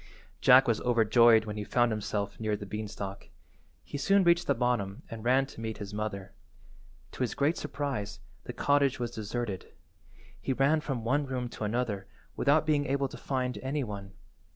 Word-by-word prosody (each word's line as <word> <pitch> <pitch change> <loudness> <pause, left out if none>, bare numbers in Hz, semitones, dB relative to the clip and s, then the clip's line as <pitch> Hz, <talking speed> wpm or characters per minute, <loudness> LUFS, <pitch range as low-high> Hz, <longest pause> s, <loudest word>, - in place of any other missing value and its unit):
Jack 130 +1 +7
was 115 -2 +1
overjoyed 115 -1 +5
when 105 -1 -5
he 105 - -3
found 120 +2 +2
himself 105 -1 -3
near 110 -1 0
the 100 - -7
beanstalk. 100 -1 -6 0.6
He 145 - -6
soon 195 +7 +4
reached 170 0 +3
the - - +3
bottom 115 -5 -1
and 115 -1 -7
ran 130 +3 +3
to 135 -4 -11
meet 110 -1 -4
his 105 -1 -7
mother. 100 -2 -4 0.8
To - - -9
his 125 - -1
great 145 +4 +2
surprise 125 -8 -4 0.3
the - - -4
cottage 140 -2 +2
was 120 -1 -2
deserted. 110 -3 -4 0.7
He 135 - -1
ran 140 +4 +3
from 135 -6 -3
one 140 +5 +1
room 125 -2 -3
to 110 - -5
another 110 -2 -2 0.3
without 150 +2 +3
being 145 -2 +1
able 140 0 0
to - - -9
find 130 -2 -2
any 140 +2 -2
one. 100 -3 -7
120 Hz, 175 wpm, -29 LUFS, 105-135 Hz, 0.8 s, Jack